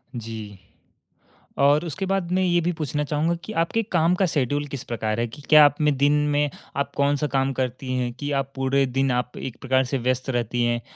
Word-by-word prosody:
जी। 110 -4 -7 1.0
और 145 +4 +4
उसके 175 +4 -3
बाद 190 -2 -1
मैं 185 +1 +2
ये 175 -1 +3
भी 175 +2 0
पूछना 150 -2 -2
चाहूँगा 150 +4 0
कि 220 - -7
आपके 195 +7 0
काम 170 0 +3
का 190 - +2
शेड्यूल 145 -3 0
किस 140 -2 -6
प्रकार 110 -2 -2
है? 120 - 0
कि 140 +6 -12
क्या 155 -1 +9
आप 145 +1 +1
दिन 145 -1 +3 0.2
में 145 0 +1 0.3
आप 140 0 -1
कौन-सा 145 +1 +1
काम 135 -1 0
करती 130 0 -3
हैं 125 -1 -1
कि 145 0 -3
आप 135 0 -4
पूरे 135 +1 +1
दिन 135 +1 0
आप 125 0 -2
एक 125 -2 -6
प्रकार 130 0 +2
से 130 +2 -1
व्यस्त 130 +1 -1
रहती 120 -1 -1
हैं? 120 0 0
140 Hz, 210 wpm, -24 LUFS, 125-150 Hz, 1.0 s, क्या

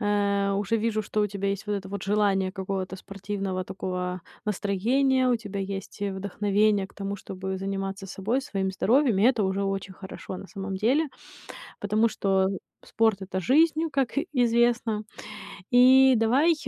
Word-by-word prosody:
э, 200 -1 +1
уже 205 +3 0
вижу, 220 -1 0
что 210 +1 -2
у 210 - +3
тебя 200 0 -3
есть 200 +1 -3
вот 210 - -1
это 195 -1 -5
вот 200 0 -5
желание 195 -2 +1
какого-то 190 -1 -4
спортивного 195 -1 -4
такого 180 -1 -4 0.2
настроения, 250 +7 +1
у 245 - +3
тебя 205 -3 -6
есть 195 0 -6
и 205 -1 -1
вдохновение 200 +1 +1
к - - -24
тому, 200 0 -4
чтобы 190 0 -5
заниматься 195 0 -4
собой, 205 +7 -1
своим 195 -7 -2
здоровьем. 235 +3 +2
И - - +2
это 235 -2 +4
уже 190 +1 0
очень 195 0 -3
хорошо 190 0 -8
на - - -9
самом 195 -1 -5
деле, 265 +10 +2 0.7
потому 215 +3 +2
что 195 -3 +1 0.4
спорт- 220 -3 +1
это 190 0 -3
жизнь, 310 - +3
как 270 -3 +1 0.2
известно. 235 -3 +2 0.7
И 260 +2 +7
давай 260 +10 +4
200 Hz, 160 wpm, -26 LUFS, 195-225 Hz, 0.7 s, И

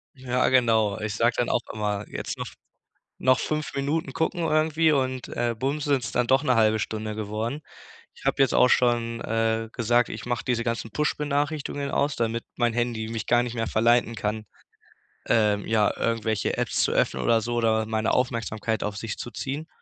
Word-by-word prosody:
Ja, 130 -1 0
genau. 110 -5 +3
Ich 105 -1 -3
sag 115 +2 +2
dann 120 - 0
auch - - +2
immer, 105 -1 -2
jetzt - - -5
noch - - -4 0.7
noch 130 0 +4
5 155 0 -2
Minuten 140 +1 -1
gucken 160 +5 -1
irgendwie 155 0 +3
und, 130 -3 -1
äh, 120 -1 -1
bumm 135 +5 -1
sind's 140 -7 0
dann 125 -1 +1
doch 135 +3 +3
'ne 130 -4 +3
halbe 110 -1 +3
Stunde 110 0 -3
geworden. 110 +6 -3 0.5
Ich - - -16
hab - - +1
jetzt 135 -3 +3
auch 125 - +6
schon, 120 -2 +2
äh, 115 0 0
gesagt, 120 0 +2
ich 110 - -6
mach 120 -1 -1
diese 120 -2 0
ganzen 115 -1 -3
Push-Benachrichtigungen 145 +1 -1
aus, 145 +2 +1
damit 115 0 -1
mein 120 -1 +1
Handy 120 -2 -1
mich 115 -1 -4
gar 120 0 +4
nicht 120 -1 -4
mehr 115 -1 -1
verleiten 115 +1 +2
kann, 105 0 -3 0.8
ähm, 105 -3 +2
ja, 110 -2 +3
irgendwelche 110 -2 0
Apps - - -2
zu - - +1
öffnen - - +1
oder 115 -1 +3
so 120 +2 -3
oder 110 -1 +2
meine 110 0 0
Aufmerksamkeit 115 -3 -1
auf 105 -1 -3
sich 105 +1 -5
zu - - -6
ziehen. 140 +7 -4
120 Hz, 185 wpm, -25 LUFS, 110-130 Hz, 0.8 s, auch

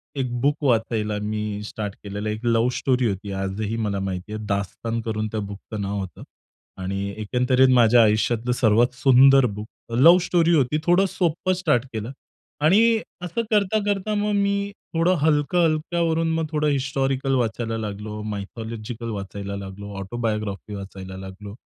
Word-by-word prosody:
एक 130 -3 -2
बुक 145 +2 +3
वाचायला 110 -4 +1
मी 105 0 -3
स्टार्ट 105 -1 -5
केलेलं 105 +1 -4
एक 110 +3 -4
लव्ह 115 +1 +3
स्टोरी 125 -2 +1
होती 100 +1 -4
आजही 95 +3 -3
मला 105 -3 -1
माहिती 95 +1 -4
आहे, 110 0 -5
'दास्तान' 105 +3 -2
करून 110 -1 -2
त्या 110 - -2
बुकचं 100 +1 -6
नाव 100 +1 -2
होतं. 95 -5 -7 0.6
आणि 100 +1 -3
एकंदरीत 125 +4 +2
माझ्या 120 -1 +6
आयुष्यातलं 110 +2 +1
सर्वात 120 +1 +3
सुंदर 135 +1 +6
बुक 105 -1 -4 0.3
लव्ह 160 +9 +7
स्टोरी 170 -1 +2
होती 145 0 +2
थोडं 175 +3 +4
सोप्पं 175 +1 0
स्टार्ट 135 -9 +1
केलं. 110 +2 -4 0.5
आणि 165 +7 +5 0.4
असं 180 +6 -2
करता, 210 0 +2
करता 205 +1 0
मग 210 0 0
मी 200 0 0 0.2
थोडं 170 +2 +3
हलकं-हलक्यावरून, 160 +2 +1
मग 160 0 0
थोडं 150 -1 +1
हिस्टॉरिकल 135 -1 0
वाचायला 115 -2 -1
लागलो, 105 0 -5
मायथॉलॉजिकल 110 +2 -6
वाचायला 100 -1 -5
लागलो, 100 +1 -8
ऑटोबायोग्राफी 105 -1 -3
वाचायला 95 -1 -8
लागलो, 95 +2 -9
115 Hz, 145 wpm, -23 LUFS, 105-145 Hz, 0.6 s, लव्ह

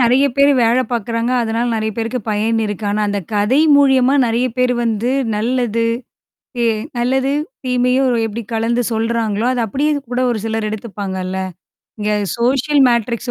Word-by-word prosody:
நெறைய 250 +3 +4
பேரு 280 +1 +5
வேல 235 +2 +3
பார்க்குறாங்க. 230 +1 -1
அதனால 230 +1 -1
நெறைய 220 0 -1
பேருக்கு 230 +2 -2
பயன் 220 +2 0
இருக்கு. 210 0 -4
ஆனா, 210 +1 -1
அந்த 205 0 -1 0.2
கதை 210 +8 +2 0.2
மூலியமா 265 -2 +4
நெறைய 235 +2 +1
பேர் 250 0 +3
வந்து 230 +1 0 0.3
நல்லது. 230 0 0 0.8
ஏ - - +3 0.3
நல்லது, 265 +3 +1 0.3
தீமையும் 250 +1 +2 0.2
எப்பிடி 225 +1 -4
கலந்து 230 +2 0
சொல்றாங்களோ! 225 -1 -1
அத 250 - -1
அப்பிடியே 285 +8 0 0.2
கூட 250 +1 -1
ஒரு 235 - -1
சிலர் 220 -1 -2
எடுத்துப்பாங்கல்ல. 195 -3 -4 0.6
இங்க 210 0 0 0.3
சோசியல் 270 +4 +2
மேட்ரிக்ஸ் 235 +1 -1
235 Hz, 145 wpm, -17 LUFS, 220-250 Hz, 0.8 s, பேரு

